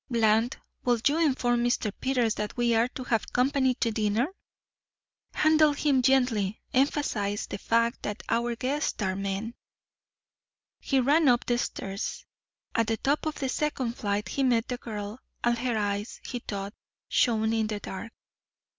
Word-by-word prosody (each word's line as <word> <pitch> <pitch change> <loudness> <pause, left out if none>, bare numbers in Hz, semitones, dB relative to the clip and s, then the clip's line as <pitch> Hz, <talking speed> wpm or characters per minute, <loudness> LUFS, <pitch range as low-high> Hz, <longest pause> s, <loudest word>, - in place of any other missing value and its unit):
Bland, 225 0 +2 0.3
will 240 -2 +2
you 295 +3 +2
inform 245 -6 +2
Mr. 240 -3 +1
Peters 250 -4 +1
that 210 +2 -4
we 240 -1 +2
are 230 +1 +3
to 255 +1 -7
have 225 -3 -1
company 260 0 +2
to 230 -2 0
dinner? 215 +2 +1 1.1
Handle 310 -1 +5
him 285 -2 +2
gently. 240 -6 +2
Emphasize 245 -7 +1
the - - -6
fact 230 +2 +1
that 210 +1 -4
our 235 0 0
guests 275 +6 -1
are 190 -2 0
men." 195 +3 -3 1.3
He 270 - +1
ran 290 +5 +4
up 240 -1 +3
the 240 -1 +1
stairs. 195 -3 -4 0.5
At 230 -2 +1
the 225 0 0
top 290 +5 0
of 310 - -2
the 270 - -2
second 265 -4 -1
flight 205 -3 -2
he 275 - -2
met 240 -3 +2
the 250 - -2
girl, 215 -1 -6 0.2
and 240 0 +3
her 245 -2 0
eyes, 205 +1 -2
he 245 - -4
thought, 200 -3 -5 0.3
shone 220 -2 +2
in 220 -1 +1
the 210 -1 -3
dark. 205 +4 -7
235 Hz, 160 wpm, -28 LUFS, 215-260 Hz, 1.3 s, Handle